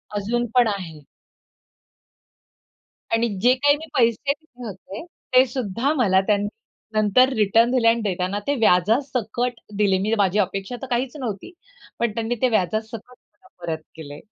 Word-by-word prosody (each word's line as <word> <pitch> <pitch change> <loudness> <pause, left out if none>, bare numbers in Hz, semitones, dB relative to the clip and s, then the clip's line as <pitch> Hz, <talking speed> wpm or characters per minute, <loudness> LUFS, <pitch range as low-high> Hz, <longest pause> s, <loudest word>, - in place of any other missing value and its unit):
अजून 230 +4 -1
पण 245 -2 +5
आहे. 180 -7 -5 2.1
आणि 230 +1 +2
जे 245 +3 +5
काही 285 +2 +3
मी 315 - -9
पैसे 240 +4 +2
दिले 250 -6 -12
होते, 195 +2 -9 0.3
ते 255 +1 +7
सुद्धा 245 +2 -1
मला 190 -7 +3
त्यांनी 205 -1 +2 0.5
नंतर 215 +4 +4
रिटर्न 225 +3 +3
दिले 250 -3 +2
आणि 230 0 +3
देताना 190 -1 -2
ते 285 - +1
व्याजासकट 230 +4 +1 0.2
दिले. 200 -2 +3
मी 215 +3 0
माझी 200 0 +2
अपेक्षा 195 +3 -2
तर 265 - -6
काहीच 250 +3 -2
नव्हती. 235 - -5 0.5
पण 235 -1 +1
त्यांनी 230 +2 -2
ते 255 - +3
व्याजासकट 220 +3 -2
मला 250 0 -23 0.2
परत 160 -2 -3
केले. 145 -2 -9
225 Hz, 145 wpm, -22 LUFS, 200-250 Hz, 2.1 s, ते